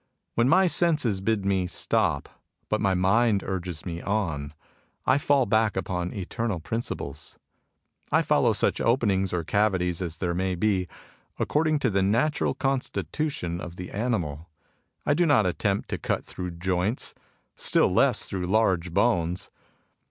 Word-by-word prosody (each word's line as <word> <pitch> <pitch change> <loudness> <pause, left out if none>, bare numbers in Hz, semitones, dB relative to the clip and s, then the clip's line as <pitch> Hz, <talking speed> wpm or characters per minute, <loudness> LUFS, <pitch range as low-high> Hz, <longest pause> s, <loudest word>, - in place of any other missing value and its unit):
When 120 +2 +2
my 185 +4 +5
senses 150 - +2
bid 105 -1 0
me 95 -2 +1
stop, 90 - 0 0.4
but 110 - 0
my 95 -2 +2
mind 100 +3 +3
urges 90 -4 -4
me 85 -2 -4
on, 80 -8 -2 0.5
I 135 - +4
fall 140 -3 +3
back 110 -1 +2
upon 90 -2 -2
eternal 100 0 -3
principles. 75 - -4 0.7
I - - +4
follow - - +3
such - - +1
openings 100 -6 +2
or 90 -2 -1
cavities 95 -2 +1
as 85 -2 -3
there 85 -2 -1
may 95 +1 -1
be, 95 -1 +1 0.5
according 155 0 +1
to 125 - +2
the 100 0 +2
natural 115 +11 +1
con 135 -1 +1
stitution 125 - -3
of 90 -1 -7
the 90 0 -7
animal. 90 -9 -2 0.6
I 145 - +3
do 170 +3 +2
not 135 -9 +4
attempt 100 +2 0
to - - -3
cut - - -2
through 90 -1 -5
joints: 95 +6 -1 0.4
still - - +3
less - - +3
through 95 -2 -3
large 95 -4 +2
bones. 90 -5 +1
95 Hz, 150 wpm, -26 LUFS, 90-115 Hz, 0.7 s, my